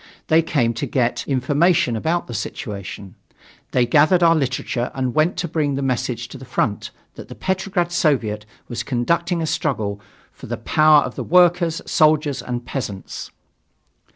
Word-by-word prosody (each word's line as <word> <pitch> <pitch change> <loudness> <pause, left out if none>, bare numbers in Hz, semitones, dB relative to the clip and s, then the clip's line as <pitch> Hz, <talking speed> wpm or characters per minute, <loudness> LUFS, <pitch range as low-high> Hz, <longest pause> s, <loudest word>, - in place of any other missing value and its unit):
They 160 0 +5
came 140 -8 0
to 115 - -3
get 125 -3 -1
information 145 +1 +2
about 165 +10 -1
the 120 - -8
situation. 100 -3 -6 0.6
They 125 -1 +2
gathered 155 +8 +4
our 165 -1 +6
literature 125 -4 -1
and 130 -2 -1
went 155 +3 +2
to 175 0 -2
bring 150 -3 -1
the 140 - -2
message 125 -2 -2
to 135 - -10
the - - -11
front 115 -4 -2 0.2
that - - -11
the - - -10
Petrograd 190 -2 -1
Soviet 125 - +1 0.2
was 120 -1 -4
conducting 170 +8 0
a - - 0
struggle 110 -10 -2 0.3
for - - -12
the - - -3
power 155 -1 +4
of 125 - -5
the - - -5
workers, 175 -1 +3
soldiers 155 -2 +2
and 120 -1 -5
peasants. 105 -8 -6
140 Hz, 160 wpm, -21 LUFS, 120-165 Hz, 0.6 s, our